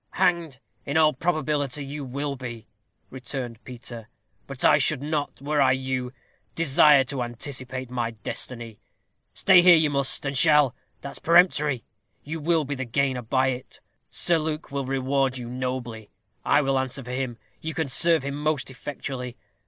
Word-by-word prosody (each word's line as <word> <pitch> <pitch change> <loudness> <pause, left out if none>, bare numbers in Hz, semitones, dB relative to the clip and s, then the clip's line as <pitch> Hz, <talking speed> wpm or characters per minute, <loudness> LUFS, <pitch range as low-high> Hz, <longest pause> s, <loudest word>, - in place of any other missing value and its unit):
"Hanged, 170 -6 +1 0.3
in 145 +2 -1
all 155 -1 +5
probability, 150 -3 -1
you 145 +1 -6
will 140 +2 -3
be," 120 -4 -8 0.5
returned 125 -2 -6
Peter; 120 -2 -9 0.4
"but 135 -2 -3
I - - +6
should 145 -3 +1
not, 150 -1 -2
were 145 0 +1
I 130 -1 +5
you, 130 -1 -2 0.4
desire 150 -3 +5
to 135 0 -4
anticipate 130 +1 -6
my 120 -2 -1
destiny. 115 0 -7 0.6
Stay 180 - +6
here 175 -1 +8
you 155 -2 +3
must, 140 0 -1
and 140 0 -2
shall 150 -3 +5 0.3
that's 140 - -7
peremptory. 150 - +3 0.4
You 160 +3 -5
will 160 0 +1
be 145 - -3
the 130 -1 -3
gainer 130 +1 0
by 130 +3 +1
it. 125 0 -6 0.3
Sir 170 -2 +2
Luke 155 -1 -4
will 140 -1 -2
reward 135 0 0
you 120 -1 -6
nobly. 125 -3 -4 0.3
I 145 +1 +3
will 135 -1 +1
answer 130 +1 -3
for 125 - -7
him. 125 -2 -3 0.2
You 160 0 -5
can 160 -3 -1
serve 165 +3 +4
him 140 0 -3
most 150 -2 -1
effectually. 130 -2 -6
135 Hz, 160 wpm, -25 LUFS, 125-150 Hz, 0.6 s, here